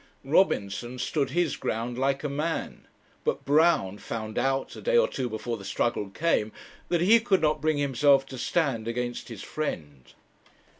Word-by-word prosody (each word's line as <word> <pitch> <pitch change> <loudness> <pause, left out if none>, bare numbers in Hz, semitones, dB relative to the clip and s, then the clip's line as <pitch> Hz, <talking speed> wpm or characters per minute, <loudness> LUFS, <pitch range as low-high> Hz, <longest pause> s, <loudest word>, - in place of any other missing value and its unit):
Robinson 125 - +1
stood 140 +2 -1
his 170 +1 0
ground 115 +2 -3
like 135 +2 0
a - - 0
man; 150 +4 -3 0.4
but - - -1
Brown 145 - +3
found 110 -1 -4
out, 135 +2 -1
a - - -9
day - - +2
or 480 - +5
two 130 -2 -3
before 115 +1 -4
the 100 - -11
struggle 105 +1 -1
came, 110 -3 0 0.4
that 170 -1 +1
he 220 +6 +6
could 210 -5 +2
not 155 -1 +1
bring 155 -1 +1
himself 140 0 +3
to 130 -2 -9
stand 130 -10 0
against 120 +1 -3
his 115 -5 -8
friend. 75 - -5
135 Hz, 165 wpm, -27 LUFS, 115-155 Hz, 0.4 s, he